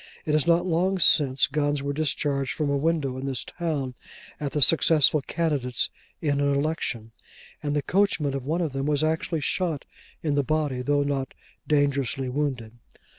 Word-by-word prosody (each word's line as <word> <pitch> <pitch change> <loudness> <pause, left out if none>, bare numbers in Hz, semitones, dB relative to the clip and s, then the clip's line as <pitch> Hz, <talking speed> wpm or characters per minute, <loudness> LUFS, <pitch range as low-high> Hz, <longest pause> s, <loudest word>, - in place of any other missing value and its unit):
It 150 - 0
is 155 +1 +2
not 170 +1 +4
long 185 +2 +1
since 140 -6 +4
guns 145 -2 -1
were 140 0 -2
discharged 140 -2 -1
from 150 -2 -1
a - - +1
window 140 -3 0
in 135 - -4
this 130 -3 -2
town 150 -7 -3 0.5
at 145 -2 -3
the 150 - 0
successful 155 0 +4
candidates 140 -6 -1 0.3
in 145 -2 +1
an 140 0 +2
election, 140 -7 -2 0.5
and 145 -1 -2
the 145 - 0
coachman 175 -7 +1
of 135 -2 -3
one 160 +6 -1
of 160 -5 -2
them 135 +1 -2
was 150 0 +1
actually 160 0 -1
shot 165 0 -1 0.4
in 150 -3 0
the 145 - +3
body, 145 -3 -1
though 145 +2 +1
not 140 -2 -3 0.3
dangerously 140 -3 +1
wounded. 125 -5 -3
145 Hz, 175 wpm, -25 LUFS, 135-155 Hz, 0.5 s, not